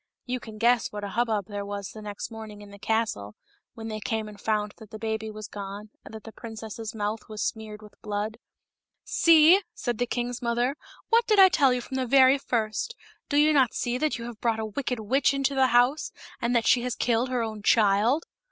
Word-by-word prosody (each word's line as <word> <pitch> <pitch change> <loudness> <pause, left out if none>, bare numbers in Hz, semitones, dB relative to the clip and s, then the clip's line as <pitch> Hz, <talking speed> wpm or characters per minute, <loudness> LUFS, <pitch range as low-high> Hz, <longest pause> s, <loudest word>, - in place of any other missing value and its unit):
You 250 0 -2
can 220 -2 -10
guess 235 +2 +2
what 205 0 -6
a 200 - -3
hubbub 220 -1 0
there 205 +1 -5
was 200 -1 -5
the 215 - -10
next 205 +2 -6
morning 215 -2 -9
in 205 - -13
the 200 - -13
castle, 215 - -1 0.4
when 225 -1 -7
they 215 -1 -4
came 220 +1 -2
and 205 -1 -12
found 210 -1 -1
that 220 - -13
the 220 - -8
baby 220 0 -3
was 215 -1 -8
gone, 205 +1 -8
and - - -12
that 220 - -9
the 225 - -10
princess's 225 0 -8
mouth 210 +1 -3
was 215 -1 -4
smeared 215 -1 -5
with 210 - -16
blood. 210 +2 -3 0.4
" - - -63 0.2
See," 335 +3 +6
said 240 -6 -3
the 245 - 0
king's 245 +1 -3
mother, 240 +3 0 0.2
" - - -24
what 460 +1 +4
did 425 - +3
I 380 -1 +9
tell 280 -7 +4
you 250 0 0
from 265 +2 -6
the 260 -1 -1
very 265 +1 +6
first. 230 - -2 0.3
Do 285 - +1
you 305 +1 +5
not 265 -5 +3
see 245 +1 -1
that 310 -2 0
you 235 - -7
have 235 -2 -9
brought 230 -2 +1
a 220 - -2
wicked 250 +3 -3
witch 260 +6 +2
into 275 0 0
the 265 -1 +4
house, 245 +5 +2 0.3
and 240 +1 0
that 230 -2 +2
she 245 - +4
has 250 0 -2
killed 240 +1 +1
her 250 -2 0
own 215 -2 -5
child 215 +8 +3
225 Hz, 230 wpm, -26 LUFS, 215-250 Hz, 0.4 s, I